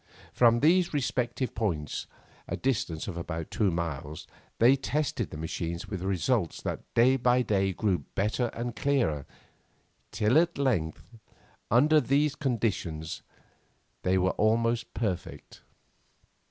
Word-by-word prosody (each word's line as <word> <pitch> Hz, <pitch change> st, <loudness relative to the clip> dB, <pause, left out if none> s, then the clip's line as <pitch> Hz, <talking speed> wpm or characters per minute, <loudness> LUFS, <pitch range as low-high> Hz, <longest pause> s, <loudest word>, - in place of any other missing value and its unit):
From 120 Hz, -1 st, +4 dB
these 170 Hz, +2 st, +3 dB
respective 125 Hz, -2 st, -1 dB
points, 85 Hz, -10 st, -2 dB, 0.4 s
a -, -, -3 dB
distance 105 Hz, -11 st, -1 dB
of 90 Hz, -4 st, -5 dB
about 85 Hz, -2 st, -5 dB
two 105 Hz, -3 st, +2 dB
miles, 80 Hz, -3 st, -4 dB, 0.3 s
they 120 Hz, +4 st, +6 dB
tested 135 Hz, -, -2 dB
the -, -, -8 dB
machines 85 Hz, +2 st, -4 dB
with 95 Hz, -4 st, -5 dB
results 95 Hz, -3 st, 0 dB
that -, -, -5 dB
day 130 Hz, +3 st, +5 dB
by 125 Hz, 0 st, +3 dB
day 95 Hz, -4 st, +1 dB
grew 95 Hz, -1 st, 0 dB, 0.2 s
better 110 Hz, +5 st, 0 dB
and 120 Hz, 0 st, -5 dB
clearer, 120 Hz, -, 0 dB, 0.8 s
till 110 Hz, +6 st, +3 dB
at 170 Hz, 0 st, 0 dB
length, 115 Hz, -, -2 dB, 0.5 s
under 150 Hz, +7 st, +5 dB
these 140 Hz, +3 st, +2 dB
conditions 100 Hz, -, -2 dB, 0.8 s
they 95 Hz, +1 st, +2 dB
were 95 Hz, 0 st, +2 dB
almost 115 Hz, +2 st, +1 dB
perfect. 100 Hz, -7 st, -4 dB
110 Hz, 125 wpm, -28 LUFS, 90-130 Hz, 0.8 s, they